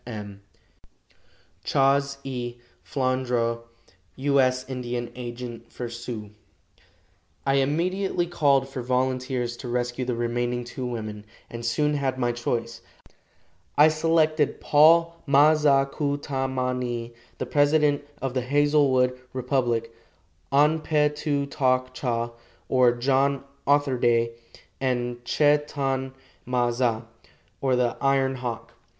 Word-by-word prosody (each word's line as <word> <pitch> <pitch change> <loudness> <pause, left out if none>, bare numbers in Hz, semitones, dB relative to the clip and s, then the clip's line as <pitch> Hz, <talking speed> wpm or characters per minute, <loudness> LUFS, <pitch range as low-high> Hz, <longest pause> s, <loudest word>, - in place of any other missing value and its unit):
M. 105 -4 -7 1.2
"CHAS. 140 0 +2
E. 125 -3 -4 0.3
FLANDRAU, 125 -3 0 0.6
"U. 140 +1 +1
S. 130 0 +1
Indian 125 -2 -4
Agent 120 -1 -7
for 120 -1 -5
Sioux." 115 -3 -7 1.1
I 135 0 +2
immediately 175 +6 0
called 140 -6 +2
for 135 -1 -6
volunteers 125 -1 -1
to 125 - -8
rescue 120 +1 -2
the 125 -1 -2
remaining 120 +1 -1
two 125 +1 -5
women, 110 -3 -5 0.3
and 115 0 -6
soon 150 +6 +1
had 135 -3 -1
my 120 -2 +1
choice. 120 -1 -3 1.0
I 150 +2 +8
selected 155 -1 +1
Paul 165 +3 +4
Ma 145 +3 +6
za 145 -3 +3
ku 145 -2 -1
ta 135 -2 -2
ma 130 -1 -1
ni, 120 -2 -4 0.2
the - - -3
president 145 +2 +2 0.2
of 135 -2 -1
the 130 - 0
Hazelwood 135 -2 +2
Republic, 120 -3 -1 0.6
An 150 +3 +4
pe 150 -1 +2
tu 150 -1 -2
tok 130 -2 0
cha, 120 -2 -2 0.4
or 125 -2 +4
John 135 +3 +1 0.2
Otherday, 125 -5 +2 0.5
and 120 -2 -2
Che 145 +2 +3
tan 135 -2 -2 0.3
ma 125 -1 +1
za, 120 -2 0 0.6
or 130 -2 +2
the 125 -1 0
Iron 135 -1 +2
Hawk. 115 -2 -5
130 Hz, 120 wpm, -25 LUFS, 120-140 Hz, 1.2 s, I